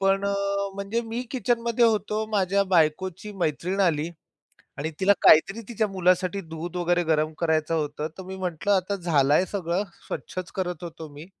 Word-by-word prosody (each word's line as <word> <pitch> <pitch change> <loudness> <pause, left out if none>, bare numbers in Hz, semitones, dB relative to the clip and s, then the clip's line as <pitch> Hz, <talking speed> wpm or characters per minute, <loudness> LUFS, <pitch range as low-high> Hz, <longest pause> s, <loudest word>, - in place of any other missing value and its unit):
पण 195 0 +2
अ, 200 - +1 0.4
म्हणजे 200 +4 -2
मी 230 +2 -3
किचनमध्ये 240 -2 +1
होतो. 220 -1 +1
माझ्या 200 -1 +2
बायकोची 185 +3 +1
मैत्रीण 180 +1 -1
आली 165 -4 +2 0.7
आणि 155 +3 -3
तिला 195 +2 +5
काहीतरी 195 +8 +6
तिच्या 220 -2 0
मुलासाठी 185 0 +1
दूध 165 0 -7
वगैरे 175 0 +1
गरम 155 -1 +1
करायचं 160 -1 +1
होतं. 150 -1 -2
तर 190 - -7
मी 190 +1 -7
म्हंटलं, 185 +2 -1
आता 190 +1 +1
झालाय 160 -3 +3
सगळं. 185 -1 -2 0.2
स्वच्छच 185 -2 -5
करत 180 -3 -3
होतो 165 -2 -7
मी. 145 +2 -10
185 Hz, 160 wpm, -25 LUFS, 160-200 Hz, 0.7 s, काहीतरी